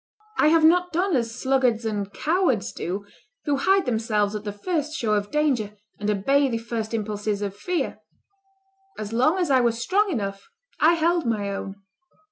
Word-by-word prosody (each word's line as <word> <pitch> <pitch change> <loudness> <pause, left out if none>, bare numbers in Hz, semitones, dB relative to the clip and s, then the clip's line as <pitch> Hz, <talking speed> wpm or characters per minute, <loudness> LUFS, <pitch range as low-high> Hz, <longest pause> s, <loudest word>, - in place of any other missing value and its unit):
I - - +5
have 320 +1 +4
not 355 +2 +4
done 360 +1 +1
as 230 -3 -1
sluggards 255 -4 +1
and 205 -2 -2
cowards 310 - 0
do, 195 +4 -4 0.4
who 285 -1 +1
hide 385 +7 +3
themselves 220 -4 0
at 210 0 -5
the 205 - -2
first 305 - -2
show 225 -9 0
of 205 -1 0
danger, 260 -9 0 0.2
and 210 +1 -2
obey 275 +8 +2
the 230 - -1
first 230 -1 -4
impulses 210 -1 -2
of 200 -1 -4
fear. 360 - -2 1.0
As 215 +1 -5
long 260 +10 +3
as 350 -6 0
I 260 -1 +5
was 235 -1 +1
strong 395 - +1
enough, 195 - -4 0.3
I 320 +3 +5
held 335 -2 +1
my 205 -3 -1
own. 195 0 -7
235 Hz, 175 wpm, -24 LUFS, 210-310 Hz, 1.0 s, I